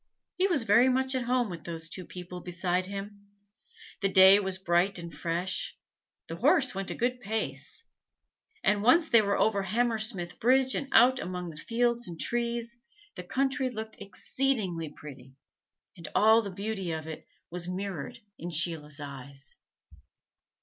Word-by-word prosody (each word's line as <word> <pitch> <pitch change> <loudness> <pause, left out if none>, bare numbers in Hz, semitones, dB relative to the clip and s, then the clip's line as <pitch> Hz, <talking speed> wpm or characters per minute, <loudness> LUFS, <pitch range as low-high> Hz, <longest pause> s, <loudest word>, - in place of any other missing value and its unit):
He 375 - +2
was 325 -10 +1
very 230 +5 +5
much 260 +1 +1
at 255 -2 -1
home 245 -1 +1
with 170 -5 -8
those 165 -1 -5
two 180 +1 -5
people 180 0 -8
beside 180 +1 -1
him; 200 +1 -8 0.7
the 195 - +2
day 190 +1 +8
was 190 -2 -1
bright 185 +1 +1
and 170 -1 -7
fresh; 175 +3 -2 0.5
the - - -7
horse 275 -8 +4
went 195 -1 -1
a - - -2
good 250 +1 -1
pace; 220 - -4 0.8
and 210 -1 +2
once 320 +9 +4
they 230 - +6
were 200 -1 0
over 205 -2 +2
Hammersmith 215 -2 0
Bridge 260 +2 +4
and 280 - -2
out 250 +3 +6
among 180 -3 -5
fields 235 +7 0
and 170 -2 -8
trees, 235 0 -1 0.4
the - - -7
country 270 0 0
looked 220 -2 -7
exceedingly 195 - -1
pretty, 135 -3 -12 0.6
and 165 -2 -9
all 220 +2 +6
the 205 - -5
beauty 195 -1 -4
of 160 -1 -4
it 160 -1 -8 0.2
was 175 0 -2
mirrored 185 - -5 0.2
in 175 - -5
Sheila's 155 -3 -1
eyes. 140 -1 -6
200 Hz, 155 wpm, -29 LUFS, 175-235 Hz, 0.8 s, day